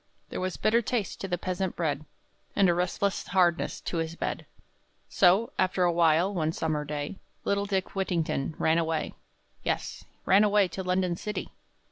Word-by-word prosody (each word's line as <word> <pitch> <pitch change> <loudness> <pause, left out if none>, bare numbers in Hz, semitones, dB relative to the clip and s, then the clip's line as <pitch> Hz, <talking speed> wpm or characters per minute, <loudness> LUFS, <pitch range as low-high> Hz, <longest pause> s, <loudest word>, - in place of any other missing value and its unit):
There - - -4
was 185 0 -2
bitter 230 +2 +3
taste 230 -3 -2
to 195 - -3
the 180 -1 -1
peasant 185 +1 -2
bread, 155 -3 -1 0.5
And 200 -1 +5
a 175 - +4
restless 180 +3 -1
hardness 175 -3 +2
to 175 - -3
his 165 0 -2
bed; - - -4 0.6
So, 195 +5 +4
after 185 0 +2
a 175 - +4
while, 170 +3 +3
one 160 -3 0
summer 155 -3 -1
day, 150 +4 -4 0.3
Little 200 0 0
Dick 190 -2 -1
Whittington 165 -6 -1
ran 160 +1 +3
away. 165 -1 -1 0.5
Yes - - -3 0.2
ran 195 +3 +6
away 205 -2 +4
to 190 - -5
London 180 -1 0
city! 210 +2 -4
180 Hz, 165 wpm, -28 LUFS, 165-195 Hz, 0.6 s, ran